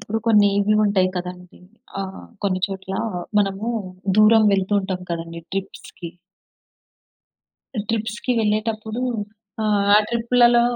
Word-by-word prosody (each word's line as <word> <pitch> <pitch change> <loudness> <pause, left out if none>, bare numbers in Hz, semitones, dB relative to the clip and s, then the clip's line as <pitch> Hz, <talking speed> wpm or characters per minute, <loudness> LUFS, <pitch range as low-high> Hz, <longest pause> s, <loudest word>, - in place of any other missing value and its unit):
ఇప్పుడు 210 +1 -3
కొన్ని 210 -3 +5
ఇవి 210 +1 +2
ఉంటాయి 195 -3 +2
కదండీ 180 0 -7 0.4
ఆహ్, 190 0 -7 0.2
కొన్ని 185 -2 0
చోట్ల 190 0 -6 0.5
మనము 195 +2 -2 0.5
దూరం 220 +1 +6
వెళ్తూ 195 0 0
ఉంటాం 190 -1 -4
కదండీ 170 0 -5
ట్రిప్స్‌కి. 195 -3 -6 1.8
ట్రిప్స్‌కి 225 +2 -2
వెళ్ళేటప్పుడు 220 +1 -1 0.6
ఆహ్, 210 -1 +2
ఆ - - +9
ట్రిప్పులలో 240 0 +4
205 Hz, 105 wpm, -22 LUFS, 190-220 Hz, 1.8 s, ఆ